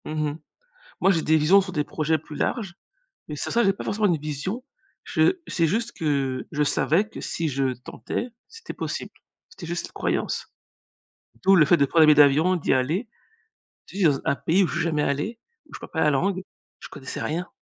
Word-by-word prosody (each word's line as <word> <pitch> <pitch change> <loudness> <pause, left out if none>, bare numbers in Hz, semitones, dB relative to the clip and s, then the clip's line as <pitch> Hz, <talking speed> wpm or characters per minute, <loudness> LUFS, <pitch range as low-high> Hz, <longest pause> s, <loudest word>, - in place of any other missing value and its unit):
Mmh 155 -1 -1
mh, 145 - -8 0.6
moi, 195 - +4
j'ai 165 -4 +2
des 160 - +3
visions 160 +6 +5
sur 190 -1 -5
des 150 -3 0
projets 155 +1 0
plus 150 0 -11
larges, 205 -8 -2 0.5
mais 150 - -5
sans - - -4
ça, 235 - +3
j'ai 195 - +3
pas - - -8
forcément 210 0 +1
une 170 -5 +1
vision 155 - -4 0.4
je 375 - +2
c'est 170 - +1
juste 225 +8 -1
que 135 -4 -1
je 150 - -1
savais 165 +7 +2
que - - -9
si 165 -2 -2
je 135 -1 0
tentais, 125 - -5 0.2
c'était 455 0 -10
possible. - - -4 0.4
C'était 280 - -10
juste 170 +1 -4
une - - -20
croyance. - - -2 0.9
D'où 195 +1 +6
le 155 - +6
fait 175 - +5
de 145 - +2
prendre 160 +3 +4
un - - +8
billet 155 -1 +6
d'avion, 150 +5 +5
d'y 175 - -1
aller. 155 - 0 0.8
Dire 185 -6 +3
z 135 - -3
un - - +1
pays 170 +7 +1
où - - +1
je 145 - -5
suis 170 - 0
jamais 160 -3 0
allé, 150 +12 -2 0.3
où - - -20
je - - -7
parle - - -11
pas 160 - -1
la 150 - +4
langue, 185 +7 0 0.4
je - - -9
ne - - -27
connaissais 135 -3 -7
rien 170 +3 -2
160 Hz, 220 wpm, -24 LUFS, 150-190 Hz, 0.9 s, un